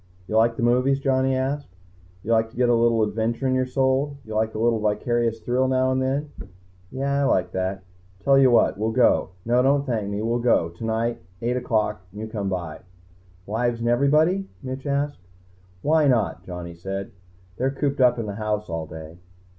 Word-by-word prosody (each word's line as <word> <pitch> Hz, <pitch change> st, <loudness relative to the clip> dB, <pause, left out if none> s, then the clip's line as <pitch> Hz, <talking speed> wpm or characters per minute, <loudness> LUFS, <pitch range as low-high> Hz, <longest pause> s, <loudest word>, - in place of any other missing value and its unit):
"You 110 Hz, -, -4 dB
like 115 Hz, +1 st, +4 dB
the -, -, -2 dB
movies?" 125 Hz, +3 st, +3 dB
Johnny 130 Hz, -1 st, +1 dB
asked. 135 Hz, -5 st, -3 dB, 0.5 s
"You 115 Hz, -, -3 dB
like 115 Hz, 0 st, +3 dB
to -, -, -17 dB
get 125 Hz, -1 st, +3 dB
a -, -, +5 dB
little 115 Hz, -1 st, +3 dB
adventure 110 Hz, +4 st, -1 dB
in 130 Hz, -, +2 dB
your 130 Hz, 0 st, +1 dB
soul? 135 Hz, +2 st, 0 dB
You 110 Hz, -, -7 dB
like 110 Hz, +1 st, 0 dB
a -, -, -2 dB
little 115 Hz, 0 st, +2 dB
vicarious 115 Hz, +2 st, 0 dB
thrill 130 Hz, +2 st, +1 dB
now 130 Hz, 0 st, +2 dB
and 130 Hz, 0 st, +1 dB
then?" 140 Hz, +3 st, -1 dB, 0.6 s
"Yeah, 140 Hz, +2 st, -1 dB
I -, -, +2 dB
like 90 Hz, -9 st, +1 dB
that." 95 Hz, +1 st, -3 dB, 0.4 s
"Tell 135 Hz, +5 st, +4 dB
you 135 Hz, -1 st, +6 dB
what. 120 Hz, -4 st, +3 dB
We'll 110 Hz, +1 st, 0 dB
go. 125 Hz, -4 st, +3 dB, 0.2 s
No, 120 Hz, +2 st, +3 dB
don't 140 Hz, +2 st, +2 dB
thank 110 Hz, -6 st, -2 dB
me. 100 Hz, +1 st, -3 dB
We'll 115 Hz, +2 st, 0 dB
go. 115 Hz, -8 st, +2 dB
Tonight. 115 Hz, +6 st, -2 dB, 0.2 s
Eight 120 Hz, +1 st, 0 dB
o'clock, 110 Hz, -5 st, 0 dB
you 105 Hz, +3 st, -6 dB
come 105 Hz, -3 st, -3 dB
by." 90 Hz, -4 st, -4 dB, 0.7 s
"Wives 115 Hz, +3 st, -1 dB
and 120 Hz, 0 st, 0 dB
everybody?" 155 Hz, +10 st, +2 dB
Mitch 130 Hz, +2 st, -5 dB
asked. 140 Hz, -1 st, -1 dB, 0.6 s
"Why 155 Hz, 0 st, +3 dB
not?" 110 Hz, -10 st, +1 dB
Johnny 90 Hz, -1 st, -7 dB
said. 95 Hz, +3 st, -5 dB, 0.5 s
"They're 130 Hz, -, +1 dB
cooped 140 Hz, 0 st, -1 dB
up 125 Hz, -1 st, +5 dB
in 115 Hz, -, -3 dB
the 100 Hz, -, -4 dB
house 105 Hz, -3 st, -2 dB
all 80 Hz, -1 st, -3 dB
day." 80 Hz, +2 st, -10 dB
120 Hz, 195 wpm, -24 LUFS, 105-130 Hz, 0.7 s, you